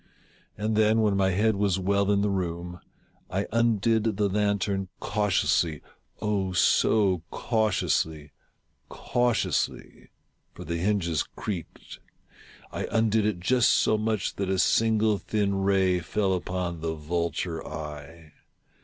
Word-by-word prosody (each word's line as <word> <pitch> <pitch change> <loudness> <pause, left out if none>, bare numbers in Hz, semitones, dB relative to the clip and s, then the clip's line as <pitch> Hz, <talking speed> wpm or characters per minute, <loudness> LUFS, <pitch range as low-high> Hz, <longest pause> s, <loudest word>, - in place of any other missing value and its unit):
And 110 +1 -1
then, 110 +1 +3
when 105 -2 +2
my 95 -1 +2
head 105 +4 +2
was 100 -2 +1
well 100 +1 +1
in 100 -1 +2
the 105 0 +1
room, 90 -1 -3 0.5
I 95 +2 -1
undid 115 -2 +1
the 105 -1 +1
lantern 100 -1 0
cautiously 95 -6 0 0.2
— - - -35
oh, 100 -3 -1
so 95 0 +3
cautiously 80 -9 -1 0.3
— - - -45
cau 120 0 0
tiously - - -2 0.5
(for 90 - -8
the 85 0 -3
hinges 85 -4 0
creaked) 90 -7 -7 0.4
— - - -23
I - - -3
undid 110 -1 +2
it 100 -5 -2
just 120 +7 +3
so - - +3
much 110 -2 -2
that 100 -1 -2
a 95 - +1
single 110 0 +2
thin 105 -2 -1
ray 95 -2 +2
fell 95 +3 -1
upon 90 -2 -3
the 80 0 -2
vulture 85 +1 -3
eye. 75 +1 -8
100 Hz, 135 wpm, -26 LUFS, 90-105 Hz, 0.5 s, then